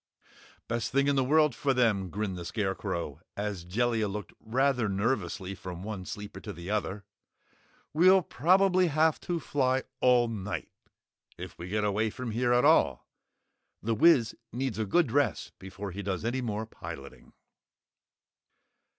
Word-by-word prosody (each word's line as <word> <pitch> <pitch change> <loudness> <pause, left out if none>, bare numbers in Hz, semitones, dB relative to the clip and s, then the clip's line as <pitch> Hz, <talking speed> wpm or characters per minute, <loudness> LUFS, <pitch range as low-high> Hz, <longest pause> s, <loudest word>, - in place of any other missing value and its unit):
"Best 120 -1 -2
thing 140 +1 +2
in 140 - +3
the 135 - +3
world 150 +1 +4
for 135 +2 0
them," 105 -7 +2
grinned 100 +1 -3
the 90 - -6
Scarecrow, 95 - -3 0.2
as 100 -4 -3
Jellia 110 +4 0
looked 100 -2 -6
rather 125 0 +1
nervously 100 -2 -1
from 90 -2 -8
one 100 -3 -6
sleeper 105 -1 -7
to - - -7
the 85 +4 -7
other. 105 -1 -2 0.9
"We'll 185 +4 +6
probably 185 +3 +3
have 155 0 +2
to 175 -1 -2
fly 130 -3 0 0.2
all 125 -1 +4
night 105 -3 -5 0.7
if - - -8
we 85 - -6
get 105 +2 0
away 105 +2 +1
from 125 +1 -5
here 120 +2 +1
at 125 +2 +4
all! 70 - +3 0.8
The 115 +2 +1
Wiz 125 -2 +4 0.2
needs 125 -2 -3
a 110 - 0
good 150 - +2
rest 140 -3 0
before 95 +1 -7
he 100 +3 -5
does 95 0 -3
any 125 +3 -1
more 110 -2 -3
piloting." 70 -10 -10
110 Hz, 150 wpm, -29 LUFS, 100-135 Hz, 0.9 s, We'll